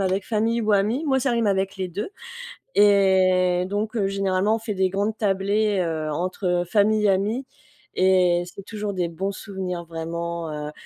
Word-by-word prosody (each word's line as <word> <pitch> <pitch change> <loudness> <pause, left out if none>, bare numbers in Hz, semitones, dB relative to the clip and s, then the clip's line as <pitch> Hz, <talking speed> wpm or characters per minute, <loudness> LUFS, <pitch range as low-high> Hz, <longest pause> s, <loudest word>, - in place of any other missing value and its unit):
avec 190 0 0
famille 230 +1 0
ou 215 -1 +1
amis. 215 +10 +1
Moi, 265 -1 +2
ça 270 - +1
rime 235 -2 +1
avec 195 0 0
les 185 -1 -3
2 200 - -5 0.6
et 185 -3 +4
donc, 210 +4 -3
heu, 195 -2 +1
généralement, 195 +2 +1
on - - -4
fait 220 -2 -4
des 190 -1 +1
grandes 205 +3 -1
tablées, 200 0 +1
heu, 160 -2 -2
entre, 185 +5 -3 0.2
heu, - - -11
famille, 210 +2 +2
amis 210 +7 0 0.5
et 180 -2 +3
c'est 195 +2 -11
toujours 210 0 -5
des 175 -2 -1
bons 190 +4 -3
souvenirs 185 -4 -5
vraiment, 170 0 -5 0.2
heu. - - -6
195 Hz, 175 wpm, -23 LUFS, 180-210 Hz, 0.6 s, et